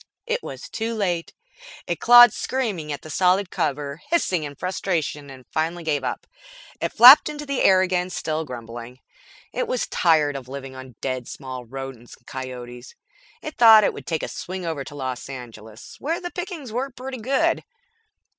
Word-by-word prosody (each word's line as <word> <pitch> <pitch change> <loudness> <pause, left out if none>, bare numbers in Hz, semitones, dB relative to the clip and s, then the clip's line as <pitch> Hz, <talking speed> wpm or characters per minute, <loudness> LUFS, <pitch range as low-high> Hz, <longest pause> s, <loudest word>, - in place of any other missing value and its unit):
It 485 +1 -1
was - - -8
too 230 +1 -3
late. 180 -6 -1 0.5
It - - -3
clawed 240 -1 +8
screaming 205 -13 -3
at 145 - -5
the 155 - -9
solid 185 +3 +2
cover, 145 +2 -2
hissed 340 - +1
in 150 -5 -2
frustration 165 -5 -3
and 130 -2 -12
finally 165 +2 -2
gave 145 -4 -1
up. 125 - -4 0.6
It - - -1
flapped 255 +7 +9
into 295 0 -6
the 280 -2 -2
air 185 -1 +5
again, 180 -1 0
still 160 -3 -3
grumbling. 120 -2 -9 0.5
It - - -2
was - - -1
tired 155 -5 +2
of 135 -2 -7
living 135 0 -8
on 130 -2 -11
dead 130 -2 -3
small 130 -3 -7
rodents 130 -1 -9
and 120 - -33
coyotes. 125 -1 -8 0.5
It 310 - -7
thought 225 -2 +9
it - - +2
would - - -10
take 160 -2 -2
a - - -2
swing 185 0 -6
over 160 -4 -3
to 145 - -10
Los 130 -2 -5
Angeles, 115 -4 -10
where 325 +4 -2
the 350 -1 -6
pickings 350 - -6
were 255 +4 -2
pretty 260 0 -7
good. 265 +5 +1
160 Hz, 175 wpm, -23 LUFS, -, 0.6 s, flapped